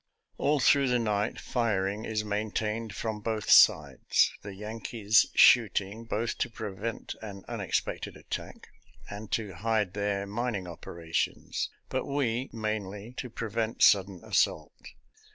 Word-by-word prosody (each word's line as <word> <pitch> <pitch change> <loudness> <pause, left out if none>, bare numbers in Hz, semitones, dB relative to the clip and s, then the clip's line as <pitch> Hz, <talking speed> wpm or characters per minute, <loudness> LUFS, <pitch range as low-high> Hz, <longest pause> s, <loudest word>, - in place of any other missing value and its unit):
All 150 0 +2
through 140 +1 +4
the 125 -1 +3
night 105 -2 -1
firing 105 -3 -1
is 110 -1 -1
main 105 +1 -2
tained 110 +1 -2
from 110 +2 -4
both 110 -1 -2
sides - - +5
— - - -37
the 100 -1 -8
Yankees 110 +1 +1
shooting, 110 -2 +4
both 115 +1 -2
to - - 0
prevent 110 0 -5
an 100 -3 -8
unexpected - - -3
attack, - - -7 0.4
and 105 +1 -8
to 105 -4 -1
hide 105 0 0
their 100 -1 -1
mining 105 -2 -3
operations; 85 -1 -3 0.2
but - - -2
we, 130 -3 -1
mainly 105 0 -4
to 125 - -5
prevent 115 0 -2
sudden 95 -3 +4
assault. - - +1
110 Hz, 135 wpm, -29 LUFS, 100-115 Hz, 0.4 s, sides